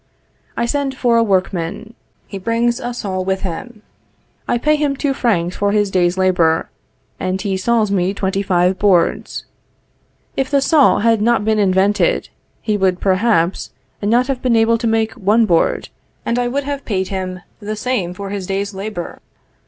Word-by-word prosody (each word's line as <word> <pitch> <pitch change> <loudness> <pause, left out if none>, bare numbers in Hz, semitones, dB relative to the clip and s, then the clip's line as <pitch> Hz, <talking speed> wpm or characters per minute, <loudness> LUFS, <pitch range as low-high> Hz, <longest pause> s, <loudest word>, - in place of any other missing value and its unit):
I 235 - +1
send 270 +1 -2
for 240 -3 +2
a - - +5
workman; 190 +1 -1 0.3
he 195 - -7
brings 230 +3 0
a 245 - -4
saw 195 -6 -3
with 190 +1 -1
him; 210 +5 -6 0.6
I - - +1
pay 300 +5 +2
him 295 -2 0
two 275 0 -1
francs 185 -9 0
for 205 0 +1
his 205 -2 +1
day's 180 -1 +1
labor, 175 -4 +2 0.5
and 185 +1 -2
he 195 -1 -2
saws 215 +2 +1
me 185 -1 +1
twenty 195 0 -1
five 185 -1 +1
boards. 185 -5 +1 0.9
If 270 -1 -1
the 280 - +3
saw 290 +1 +4
had 225 -1 +3
not 230 -1 +2
been 220 -1 +2
invented, 200 - +2 0.3
he 215 -2 0
would 185 -2 +1
perhaps 190 -2 +1 0.3
not 235 +5 +2
have 265 -2 -3
been 250 -2 +2
able 225 0 +3
to 230 - -1
make 225 0 +1
one 215 +4 +2
board, 170 -5 +1 0.4
and 235 +1 0
I 245 - 0
would 280 +4 -1
have 280 -1 -4
paid 190 -3 -2
him 185 -2 -4 0.2
the 215 0 -4
same 210 -6 -2
for 195 +1 -6
his 195 -3 -4
day's 200 +1 -2
labor. 195 -2 -6
205 Hz, 175 wpm, -18 LUFS, 190-235 Hz, 0.9 s, a